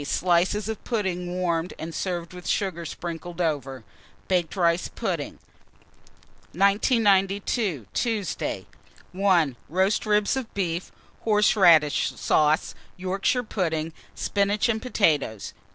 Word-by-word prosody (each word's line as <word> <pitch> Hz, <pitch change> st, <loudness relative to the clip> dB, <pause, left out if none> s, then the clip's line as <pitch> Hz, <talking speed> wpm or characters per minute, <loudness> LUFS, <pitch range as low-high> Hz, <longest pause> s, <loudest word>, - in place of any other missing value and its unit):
Slices 180 Hz, +6 st, +1 dB
of 220 Hz, -2 st, -5 dB
pudding 190 Hz, -6 st, -2 dB
warmed, 175 Hz, -1 st, -1 dB
and 165 Hz, +1 st, -6 dB
served 175 Hz, 0 st, -3 dB
with 180 Hz, -1 st, -9 dB
sugar 180 Hz, -4 st, -1 dB
sprinkled 170 Hz, +1 st, -7 dB
over. 140 Hz, -7 st, -2 dB, 0.4 s
Baked 175 Hz, -4 st, 0 dB
rice 170 Hz, -2 st, +2 dB
pudding. -, -, -3 dB, 1.2 s
1992. 200 Hz, -, +2 dB
Tuesday. 220 Hz, -5 st, -2 dB, 0.5 s
1. 180 Hz, -8 st, +2 dB
Roast 190 Hz, +6 st, +1 dB
ribs 210 Hz, +1 st, +2 dB
of 260 Hz, -4 st, -4 dB
beef, 175 Hz, -3 st, -2 dB, 0.3 s
horseradish 190 Hz, -8 st, +4 dB
sauce, 155 Hz, +1 st, +2 dB, 0.2 s
Yorkshire 195 Hz, +7 st, 0 dB
pudding, 165 Hz, -7 st, -2 dB, 0.2 s
spinach 205 Hz, +3 st, +1 dB
and 220 Hz, -1 st, 0 dB
potatoes. 150 Hz, -, 0 dB
185 Hz, 105 wpm, -25 LUFS, 165-205 Hz, 1.2 s, horseradish